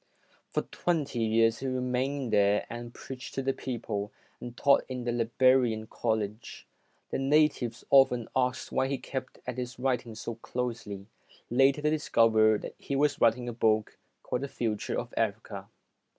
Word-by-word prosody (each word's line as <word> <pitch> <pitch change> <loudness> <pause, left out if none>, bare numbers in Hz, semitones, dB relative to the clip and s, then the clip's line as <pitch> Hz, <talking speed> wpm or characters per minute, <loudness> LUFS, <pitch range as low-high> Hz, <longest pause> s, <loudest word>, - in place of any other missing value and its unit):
For - - -1
twenty 150 -8 -2
years, 115 0 +3
he 135 - -3
remained 130 0 -1
there 100 0 +3
and 120 0 -6
preached 130 +1 -9
to 135 - -1
the 135 0 +1
people, 105 -6 -4 0.3
and 120 0 -8
taught 140 -1 +4
in 125 -1 -4
the 120 - -1
Liberian 120 -1 +2
College. 110 0 -3 0.5
The - - -1
natives 135 -4 +2
often 125 -4 +5
asked 125 0 0
why 130 - +1
he 135 0 -1
kept 130 0 -6
at 125 0 -4
his 125 -1 -5
writing 125 -3 -1
so 115 +1 -5
closely. 115 -4 -5 0.5
Later 135 +4 +4
they 150 - +3
discovered 110 -7 +3
that - - -6
he 140 - -3
was 145 0 +1
writing 120 +2 +3
a 120 - -3
book 110 -2 +1 0.2
called 125 - -2
"The 140 - -3
Future 110 -6 -2
of - - -5
Africa". - - -2
125 Hz, 160 wpm, -29 LUFS, 115-135 Hz, 0.5 s, often